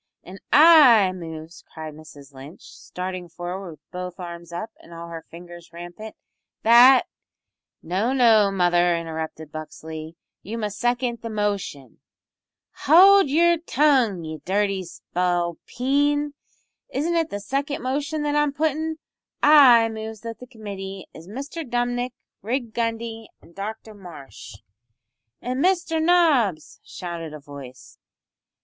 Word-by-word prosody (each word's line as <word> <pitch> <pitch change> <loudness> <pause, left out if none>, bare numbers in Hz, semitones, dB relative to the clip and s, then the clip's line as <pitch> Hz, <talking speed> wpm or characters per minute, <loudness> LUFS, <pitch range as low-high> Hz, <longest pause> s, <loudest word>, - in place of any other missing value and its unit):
"An' 190 +2 -11
I 285 - +7
moves," 165 -2 -9
cried 155 -1 -8
Mrs 145 -2 -14
Lynch, 135 +5 -12
starting 180 -1 -7
forward 175 +2 -6
with 150 -2 -15
both 180 0 -7
arms 170 -1 -8
up 195 +6 -6
and - - -17
all 170 0 -9
her 165 -1 -8
fingers 175 0 -12
rampant, 175 +6 -10 0.5
"that 245 +3 +7 0.4
" - - -59
"No, 215 +7 +1
no, 225 -6 +5
mother," 175 -2 +2
interrupted 160 -2 -6
Buxley, 155 +1 -8 0.3
"you 220 +4 -6
must 210 -2 -4
second 240 -1 -1
the 230 - -6
motion." 200 - -3 0.7
"Howld 375 +3 +6
yer 340 +4 +4
tongue, 270 - +2
ye 155 -1 -7
dirty 195 0 0
spalpeen! 250 - -1 0.6
Isn't 310 +6 -1
it 325 -1 +1
the 205 - -5
second 275 +6 -3
motion 285 +4 -2
that 295 0 -1
I'm 295 -1 +1
puttin'? 315 +1 -1 0.5
I 265 -6 +7
moves 220 -1 -7
that 230 -1 -7
the 250 - -11
committee 195 -5 -8
is 165 - -13
Mr 280 - -6
Dumnik 245 -1 -2 0.3
Rig 235 +1 -3
Gundy 230 -1 -3
an' 170 - -20
Dr 215 +3 -7
Marsh 150 - -12 0.4
" 120 0 -57
"An' 255 +2 -2
Mister 350 -2 +1
Nobbs," 315 - +2
shouted 170 -3 -7
a - - -9
voice. 140 -3 -12
210 Hz, 130 wpm, -23 LUFS, 170-260 Hz, 0.7 s, I